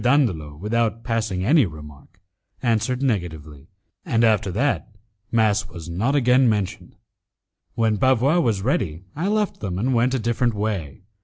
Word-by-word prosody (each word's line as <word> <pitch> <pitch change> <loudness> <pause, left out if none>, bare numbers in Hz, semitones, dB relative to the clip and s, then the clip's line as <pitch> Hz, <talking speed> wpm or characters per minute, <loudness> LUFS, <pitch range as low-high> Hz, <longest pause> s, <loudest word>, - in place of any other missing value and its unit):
Dandolo, 110 - +1
without 115 +5 -1
passing 110 -6 -1
any 140 - +4
remark, 75 +2 -13 0.4
answered 120 +2 0
negatively, 80 - -3 0.4
and 115 0 +1
after 110 -3 +3
that, 140 +8 0 0.4
mass 110 -3 +2
was 85 0 -9
not 115 +12 0
again 125 -2 +4
mentioned. 100 -3 -3 0.8
When 110 -2 +1
Bavois 130 - +3
was 110 - 0
ready, 90 - -1
I 165 +6 -2
left 210 -1 0
them 90 -3 -4
and 125 +7 0
went 125 +2 +2
a - - 0
different 120 +1 0
way. 100 -7 -3
110 Hz, 145 wpm, -22 LUFS, 90-125 Hz, 0.8 s, any